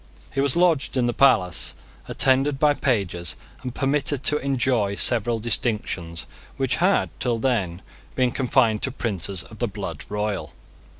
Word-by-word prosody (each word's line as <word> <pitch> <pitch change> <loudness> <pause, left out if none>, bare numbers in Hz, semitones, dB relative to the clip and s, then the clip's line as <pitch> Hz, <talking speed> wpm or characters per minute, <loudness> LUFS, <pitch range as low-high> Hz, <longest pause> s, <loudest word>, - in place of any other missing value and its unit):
He 135 - +1
was 140 -2 +2
lodged 170 -6 +2
in 125 - +2
the 120 - 0
palace, 90 - +3 0.3
attended 135 +2 +2
by 150 +1 +4
pages, 95 - -1 0.3
and 125 -1 -6
permitted 140 0 0
to 150 +3 +3
enjoy 125 -7 0
several 120 +1 +2
distinctions 105 -8 -2 0.3
which 130 -1 0
had 185 +4 +2
till 120 -2 0
then 100 -8 -1 0.3
been 125 -1 +2
confined 115 -4 +2
to 135 - 0
princes 100 - -3
of 110 - -14
the 120 - 0
blood 95 -6 -6
royal. 105 -7 -3
120 Hz, 145 wpm, -23 LUFS, 100-135 Hz, 0.3 s, by